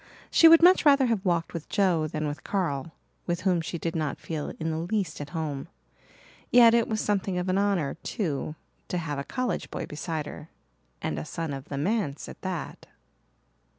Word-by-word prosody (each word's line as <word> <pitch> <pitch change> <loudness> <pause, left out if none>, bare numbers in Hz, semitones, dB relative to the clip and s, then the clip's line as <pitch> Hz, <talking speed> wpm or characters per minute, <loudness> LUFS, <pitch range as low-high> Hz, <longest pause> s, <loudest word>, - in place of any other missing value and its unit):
She 330 - +8
would 330 0 +8
much 365 +2 +7
rather 280 -3 +6
have 225 -5 0
walked 170 -3 0
with 165 -3 -6
Joe 180 -6 +2
than 155 0 -3
with 145 +1 -5
Carl, 165 -7 -2 0.4
with 175 0 -1
whom 185 -3 +2
she 165 +1 -4
did 165 0 -3
not 155 -3 -1
feel 155 -3 -4
in 160 0 -1
the 160 - -2
least 175 -3 -2
at 145 - -6
home. 155 -4 -4 0.8
Yet 235 -2 +7
it 235 -1 +3
was 215 -1 -1
something 195 -3 0
of 180 +1 -2
an 185 +1 +2
honour, 195 -8 +1
too, 155 - -3 0.3
to 180 - -2
have 150 -4 -3
a - - -3
college 250 - -2
boy - - -4
beside 155 0 -4
her, 150 +2 -9 0.5
and 75 - -2
a - - -4
son 160 - -4
of 135 0 -6
the 140 - -5
manse 155 -2 -1
at - - -11
that. 180 -6 -5
170 Hz, 195 wpm, -27 LUFS, 155-200 Hz, 0.8 s, She